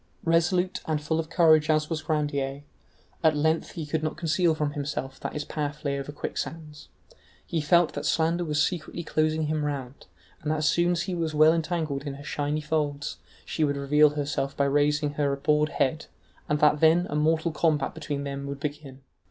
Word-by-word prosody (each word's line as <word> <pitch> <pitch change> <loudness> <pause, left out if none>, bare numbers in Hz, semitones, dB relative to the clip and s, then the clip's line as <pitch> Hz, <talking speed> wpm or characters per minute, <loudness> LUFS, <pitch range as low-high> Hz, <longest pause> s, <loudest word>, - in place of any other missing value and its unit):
Resolute 175 +3 +2
and 155 -2 0
full 155 +2 -1
of 160 -1 -3
courage 155 -3 +4
as 155 -1 +2
was 160 -1 -3
Grandier, 145 -3 -2 0.6
at 155 -2 +4
length 160 +2 0
he 160 - -5
could 155 +1 -2
not 155 0 -3
conceal 165 0 +2
from 150 -1 -1
himself 140 -2 -4
that - - -5
his 150 - -4
path 150 0 -4
lay 140 -1 0
over 140 +1 -6
quicksands: 150 +1 -6 0.6
he 165 - -1
felt 170 +2 +3
that - - -3
slander 165 +2 +1
was 150 -1 +2
secretly 170 0 -4
closing 155 0 0
him 155 0 -1
round, 140 -3 -5 0.3
and 150 - -3
that 155 - +1
as 150 0 +1
soon 175 +2 +3
as 170 - -1
he 185 - -4
was 165 -3 -2
well 155 +1 +6
entangled 160 -4 -1
in 140 - -4
her 140 - -10
shiny 145 +1 -2
folds, 150 -2 -2 0.3
she 160 - -1
would 145 -1 +1
reveal 150 +2 +4
herself 140 -2 -2
by 140 - +3
raising 145 +1 +2
her 145 -1 0
abhorred 150 +2 +2
head, 155 +2 -1 0.4
and 150 0 +1
that 150 0 +4
then 165 +3 +5
a - - -2
mortal 160 +2 +2
combat 155 -2 +1
between 145 -3 -4
them 140 0 -5
would 140 0 -5
begin. 145 -2 -6
150 Hz, 195 wpm, -26 LUFS, 145-160 Hz, 0.6 s, well